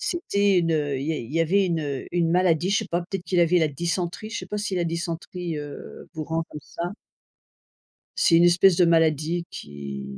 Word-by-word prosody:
c'était 200 - +1
une, 165 - 0
heu, 145 -3 0
il 140 - -4
y 160 - 0
a - - -2
il 120 +3 -8
y 165 - +1
avait 190 +4 +3
une, 170 -2 0
heu, 140 -3 -4
une 170 -2 +1
maladie 175 0 +2
je 200 - +3
sais 220 - -3
pas, 175 - +1
peut-être 180 +1 -5
qu'il 180 -2 +1
avait 170 +1 +4
la 160 -2 +2
dysenterie, 175 +7 -3
je - - -3
sais - - -7
pas 210 - -4
si 205 -2 -2
la 175 - 0
dysenterie, 170 0 -4
heu, 145 -1 -9
vous 155 -2 -4
rend 165 +1 -1
comme 150 - -8
ça. 170 - -8 1.3
C'est 165 - +4
une 170 - +6
espèce 175 +1 +5
de 180 - +5
maladie 165 0 +2
qui 70 -2 -7
170 Hz, 225 wpm, -24 LUFS, 155-180 Hz, 1.3 s, une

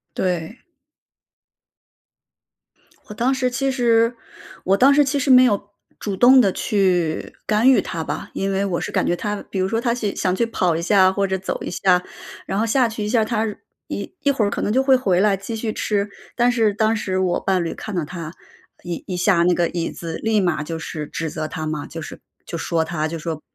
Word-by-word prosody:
对。 180 +5 -2 2.5
我 - - -6
当 240 +5 +1
时 260 -1 0
其 270 +2 0
实 235 -2 +2 0.5
我 195 +2 +2
当 270 +6 +6
时 295 +1 +5
其 285 +1 -1
实 275 - -1
没 255 -1 +8
有 205 -4 +1 0.3
主 200 -2 -3
动 255 +6 +7
地 200 -5 +2
去 180 -6 0
干 220 +4 +3
预 265 - +5
他 165 -2 -4
吧。 - - -5
因 195 0 -2
为 195 +1 0
我 180 -3 -2
是 - - -4
感 - - +1
觉 175 - +1
他， 210 +3 -3
比 195 - -3
如 185 - +1
说 225 +3 -1
他 235 -2 +1
去 215 -4 -3
想 185 -2 0
去 235 - +1
跑 185 -7 0
一 165 - -2
下 185 0 +4
或 195 +1 0
者 190 0 -1
走 190 - -4
一 - - -4
下， 180 0 +2 0.4
然 195 - -3
后 225 - +2
下 245 +2 +3
去 220 -1 -5
一 - - -2
下 230 0 +3
儿， - - +1
他 225 -1 0 0.4
一 - - -5
一 285 - +3
会 235 -6 +1
儿 - - +1
可 - - -3
能 - - 0
就 265 - +3
会 265 -1 +5
回 195 -9 +1
来 205 0 +3
继 200 +4 -6
续 220 -1 -3
吃。 205 -1 -1 0.3
但 245 0 +3
是 225 -4 +2
当 220 +2 +1
时 190 -3 -2
我 185 -2 +1
伴 185 -2 0
侣 165 - -3
看 215 -3 -7
到 170 -4 -1
他 165 -1 -7 0.5
一 175 -2 -5
一 185 - -3
下 175 -1 +3
那 180 +1 +3
个 175 -1 +1
椅 170 -1 -3
子 165 -1 -6
立 220 -1 +2
马 175 -5 0
就 165 +1 -5
是 155 -2 -5
指 165 +1 -4
责 155 0 -4
他 155 0 -5
嘛， 155 -1 -3
就 165 - -7
是 - - -9 0.3
就 170 - -5
说 165 0 0
他 160 -1 -2
就 165 +1 -5
说： 160 -1 -4
195 Hz, 245 characters per minute, -21 LUFS, 175-230 Hz, 2.5 s, 没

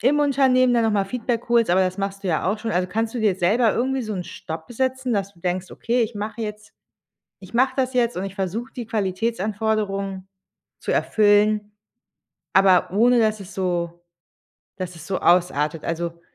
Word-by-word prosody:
im 275 +6 +3
Unternehmen 260 -3 +3
dann 235 -1 +3
noch 220 - +2
mal 200 -2 +1
Feedback 240 +2 -3
holst, 235 -3 +4
aber 185 +1 +4
das 185 +1 -2
machst 195 0 -4
du - - -1
ja 160 - 0
auch 210 - -2
schon. 225 0 -4
Also, 180 +1 0
kannst 225 +4 -1
du 240 - -2
dir 210 -4 +3
selber 215 +6 +2
irgendwie 265 +2 0
so 215 -2 -4
'n 180 -2 -4
Stopp 160 +7 -8
setzen, 260 0 -1
dass 200 -2 -2
du 170 - -22
denkst: 180 +1 -2
„Okay, 240 +2 -1
ich 225 +1 -3
mache 210 +2 -5
jetzt 210 0 -7 0.7
ich 190 +4 -14
mache 260 +2 +3
das 260 -1 0
jetzt 240 -3 +1
und 185 - -2
ich 195 0 -6
versuche 205 +6 -3
die 245 -3 -5
Qualitätsanforderungen 200 -2 -2 0.5
zu - - -2
erfüllen, 210 0 +3 0.8
aber 190 -2 +5
ohne 240 +4 +4
dass 215 -1 +2
es 195 +1 -10
so 175 -2 -2 0.8
dass 180 -2 -5
es 165 0 -11
so 190 - -1
ausartet“? 165 -3 +2
Also, 170 0 -3
210 Hz, 190 wpm, -23 LUFS, 185-235 Hz, 0.8 s, aber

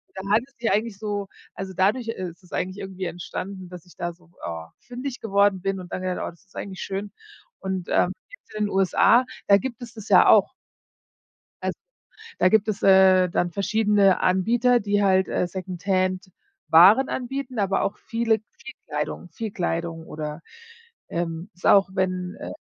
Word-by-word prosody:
Dann 190 +1 -6
hatte 220 +3 +3
ich 275 - -31
die 235 - 0
eigentlich 215 -1 0
so 205 -2 -3 0.3
also 190 0 -6
dadurch, 215 +6 +1
äh, 185 -5 -3
ist 170 +3 -18
es 180 - -21
eigentlich 185 +2 -3
irgendwie 190 -1 -6
entstanden, 185 +2 -6
dass 180 -1 -11
ich 180 - -19
da 175 0 -3
so, 175 0 -24
ah, 80 -1 -6
fündig 245 +2 -6
geworden 200 -3 +2
bin 195 0 -2
und 180 - -11
dann - - -3
habe 185 - -4
ich - - 0
gedacht: - - -3
„Oh, - - -6
das 170 +3 -22
ist 190 - -23
eigentlich 190 -2 -6
schön.“ 200 +1 -4 0.5
Und, 190 -2 -4
ähm, 180 - +2 0.2
gibt's - - -16
in 215 0 0
den - - -5
USA 195 +6 +4 0.2
da 200 - +8
gibt 245 0 -6
es 235 -2 -9
das 220 -2 -10
ja - - +6
auch. - - +5 1.1
Also, - - -3 0.6
da 185 - +5
gibt 220 +1 +3
es, 210 -2 -2
äh, 190 -1 +6
dann 175 0 0
verschiedene 200 0 +2
Anbieter, 235 +7 +3
die 205 0 +1
halt, 190 -1 +3
äh, - - 0
Secondhand-Waren 185 - +2
anbieten, 260 0 -4
aber 195 -1 +1
auch 200 - -2
viele 230 -2 0 0.2
viel 265 0 -11
Kleidung 150 +3 -4
viel 225 -2 -5
Kleidung 165 -2 -3
oder, 150 +1 -6 0.7
ähm, 170 +2 -4
es 180 - -23
ist - - -4
auch, 195 -1 +5
wenn, 185 -1 -2
äh, - - -6
195 Hz, 190 wpm, -24 LUFS, 180-215 Hz, 1.1 s, da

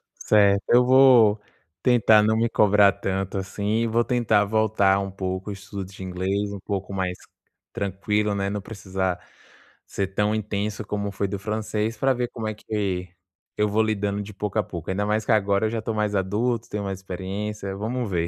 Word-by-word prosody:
Certo, 100 -2 +3
eu 125 +1 +6
vou 125 -5 +6 0.4
tentar 110 -4 +5
não 110 +1 +2
me 115 - +2
cobrar 105 -1 +5
tanto, 95 -1 -3
assim, 100 +3 -1
e 115 - +1
vou 115 +1 +2
tentar 115 -4 +2
voltar 100 -2 +2
um 100 -1 -4
pouco 95 +1 -4
o - - -3
estudo 100 0 -7
de 95 - -12
inglês, 95 +3 -2
um 100 - -6
pouco 100 0 -4
mais 90 -1 -2 0.6
tranquilo, 105 +2 -1
né. 100 0 -1
Não 105 0 -3
precisar 95 -3 -3 0.7
ser 100 - -2
tão 105 +2 0
intenso 105 0 -3
como 100 0 -3
foi 100 0 -2
do 100 +1 -4
francês, 110 +1 -2
pra 135 +4 +2
ver 125 -1 -2
como 115 -2 -5
é 110 - -2
que 100 -4 -3 0.5
eu 105 - +2
vou 110 +2 +2
lidando 105 -2 -1
de 105 +1 -8
pouco 100 0 -4
a - - +2
pouco, 85 -3 -7
ainda 100 +2 -1
mais 105 +1 0
que - - +1
agora 100 0 +2
eu - - -1
já 115 0 -3
tô 115 +1 -3
mais 105 -1 -1
adulto, 110 +5 0
tenho 105 0 -3
mais 95 -1 -4
experiência. 95 +2 -5
Vamos 115 +3 -3
ver. 85 -3 0
105 Hz, 195 wpm, -24 LUFS, 95-110 Hz, 0.7 s, eu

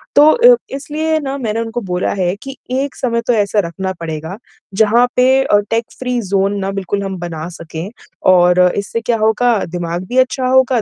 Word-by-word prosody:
तो 295 +1 +7
अ, - - +6 0.2
इसलिए 310 +3 -2
ना 275 -2 -4
मैंने 225 -3 -2
उनको 230 +1 -4
बोला 180 0 0
है 180 +1 0
कि 270 0 -7 0.2
एक 270 +1 -2
समय 235 -3 -1
तो 245 - +3
ऐसा 210 -1 +1
रखना 190 +2 -4
पड़ेगा, 160 +3 -5 0.4
जहाँ 225 +4 +4
पे 260 +1 +4
अ, 205 - +3
टेक 225 0 +1
फ्री 250 -1 -1
ज़ोन 200 +1 +1
ना 195 0 -2
बिल्कुल 195 +1 -3
हम 190 -1 -4
बना 165 -2 -5
सके 165 +2 -6 0.5
और 180 0 +4 0.2
इससे 205 +3 -3
क्या 230 0 0
होगा, 220 +2 +2
दिमाग 175 +1 -4
भी 250 - -2
अच्छा 255 0 +2
होगा, 260 -2 +3
220 Hz, 190 wpm, -16 LUFS, 190-255 Hz, 0.5 s, तो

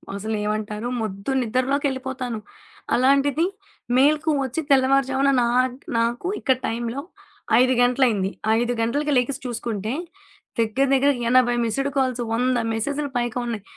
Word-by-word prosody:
అసలేమంటారు? 210 +1 -3
మొద్దు 200 +2 -4
నిద్రలోకెళ్ళిపోతాను. 260 0 -1 0.6
అలాంటిది 275 +4 +3 0.5
మేల్కువచ్చి 295 0 +2
తెల్లవారు 275 0 +4
జామున 270 +1 +2
నాక్ 250 +1 +1 0.2
నాకు 235 +7 0
ఇక్కడ 260 - +2
టైంలో 235 +3 -3 0.6
5 255 +1 +4
గంటలయింది. 245 -6 +2 0.3
5 240 +1 0
గంటలకి 290 +6 0
లెగిసి 250 +2 0
చూసుకుంటే, 230 -2 -3 0.7
దగ్గర 230 +5 +2
దగ్గర 275 +1 +4 0.2
80 245 -1 +4
మిస్డ్ 275 +5 -1
కాల్స్ 255 -2 +1
100 250 +2 +1 0.2
మెసేజ్లు 285 +6 -2
పైగా 240 0 -2
ఉన్నాయి. 225 -4 -4
250 Hz, 115 wpm, -23 LUFS, 230-275 Hz, 0.7 s, తెల్లవారు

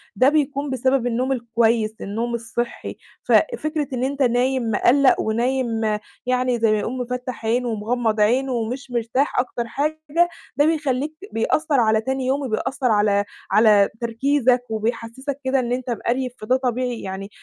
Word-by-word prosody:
ده 255 +7 +5
بيكون 290 -1 0
بسبب 260 -1 +1
النوم 250 +3 0
الكويس، 230 -3 +1
النوم 230 +4 -3
الصحّي، 235 +1 -4 0.3
ففكرة 310 - +1
إن 250 0 -1
أنت 275 +1 -2
نايم 245 -1 +1
مِقلَّق 260 +6 +4
ونايم 235 +1 0 0.4
يعني 250 -1 +1
زي 225 -1 +3
ما 215 - +2
يقولوا 235 +5 -3
مفَتّح 250 -1 -5
عين 240 +3 +1
ومغمض 225 0 -1
عين 250 +6 +3
ومش 250 +2 -3
مرتاح 240 +4 0
أكتر 245 -1 -2
حاجة 310 +5 0 0.3
ده 290 - +4
بيخلّيك 300 -2 0
ت - - -8
بيأثّر 290 +5 +1
على 220 -1 +3
تاني 265 +2 -2
يوم 270 +3 0
وبيأثّر 255 +2 -1
على 205 -1 +2 0.3
على 210 -1 +5
تركيزك 250 +2 +2
وبيحسّسك 230 +5 -3
كده 265 +1 +1
إن 240 -1 -2
أنت 250 0 -2
مقريف، 245 +2 -1
فده 215 +4 +1
طبيعي 250 -2 -2
يعني 190 +1 -6
245 Hz, 150 wpm, -22 LUFS, 225-265 Hz, 0.4 s, ده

